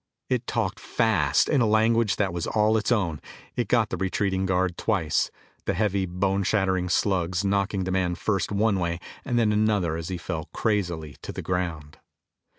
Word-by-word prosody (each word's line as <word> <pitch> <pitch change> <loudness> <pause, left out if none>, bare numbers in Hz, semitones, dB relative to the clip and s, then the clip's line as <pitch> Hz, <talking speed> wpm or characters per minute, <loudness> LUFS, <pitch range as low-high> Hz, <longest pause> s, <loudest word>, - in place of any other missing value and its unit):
It 125 -1 0
talked 110 -3 -1
fast 90 - +2
in 145 -4 +2
a 115 - +3
language 110 -2 +3
that 95 -2 0
was 85 -2 -3
all 110 0 +2
its 110 +2 0
own. 85 - 0 0.3
It - - -1
got - - +2
the 95 - -2
retreating 95 +1 0
guard 90 -1 +1
twice, 90 -9 0 0.4
the - - 0
heavy, 100 -1 +1
bone 95 +2 0
shattering 95 -2 +1
slugs 90 0 +1
knocking 100 0 +1
the 95 - -2
man 90 -2 +1
first 100 +2 -1
one 100 -1 +2
way 85 -1 -1 0.2
and 120 -3 -1
then 110 -3 +3
another 105 -6 +1
as 80 -1 -5
he 95 - -3
fell 80 -2 -5
crazily 85 - -1
to - - -6
the - - -6
ground. 85 -5 -3
95 Hz, 180 wpm, -26 LUFS, 90-105 Hz, 0.4 s, a